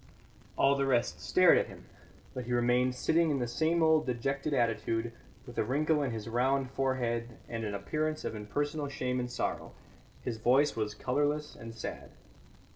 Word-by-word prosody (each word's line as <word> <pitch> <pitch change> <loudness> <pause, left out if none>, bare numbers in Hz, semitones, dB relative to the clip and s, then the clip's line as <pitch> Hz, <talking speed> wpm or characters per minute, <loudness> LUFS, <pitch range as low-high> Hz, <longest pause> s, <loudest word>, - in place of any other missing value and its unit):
All 135 - +5
the 140 -1 0
rest 120 -3 +1
stared - - +5
at - - -1
him, - - -12 0.5
but 125 -2 -5
he 125 - -2
remained 125 +1 +2
sitting 165 +5 +2
in 145 - +1
the 120 -2 -1
same 160 +7 +1
old 160 -2 +4
dejected 135 +4 -1
attitude, 115 -2 0 0.3
with - - -7
a - - +3
wrinkle 150 +6 +1
in 140 - 0
his 110 -2 -5
round 130 +3 +1
forehead 120 -3 -1
and 115 -1 -4
an 105 -2 -3
appearance 155 +10 -2
of - - -2
impersonal 145 +8 -2
shame 125 -2 -2
and 125 0 -2
sorrow; 125 - -3 0.5
his 115 -2 -3
voice 135 +6 +3
was 105 -2 -2
colourless 145 +3 -1
and 115 -1 -9
sad. 115 - -6
125 Hz, 175 wpm, -31 LUFS, 120-145 Hz, 0.5 s, All